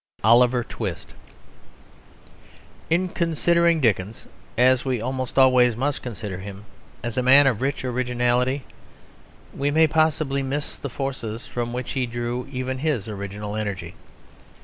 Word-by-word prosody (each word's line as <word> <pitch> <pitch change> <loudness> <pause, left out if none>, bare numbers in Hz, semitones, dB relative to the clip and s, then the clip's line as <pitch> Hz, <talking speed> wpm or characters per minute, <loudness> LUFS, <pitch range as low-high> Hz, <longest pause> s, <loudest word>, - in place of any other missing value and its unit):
OLIVER 120 +2 +5
TWIST 100 -6 -6 1.8
In 175 +3 +2
considering 170 0 +2
Dickens, 110 -4 0 0.3
as 125 +1 +4
we 130 -3 -1
almost 130 +2 -3
always 125 -3 +5
must 140 +4 -1
consider 105 -6 -6
him, 100 +2 -9 0.4
as 120 +1 -2
a - - +2
man 135 +3 +7
of 125 -5 +1
rich 135 0 -1
originality, 125 +1 0 0.9
we 140 +1 0
may 160 +2 +5
possibly 155 -3 +1
miss 140 +2 -3
the 140 - -6
forces 120 -4 -5
from 120 -1 -4
which 125 0 -4
he 130 -2 -1
drew 120 +1 -4
even 130 0 -3
his 140 -8 -1
original 105 0 -5
energy. 100 -5 -4
125 Hz, 130 wpm, -23 LUFS, 115-135 Hz, 1.8 s, man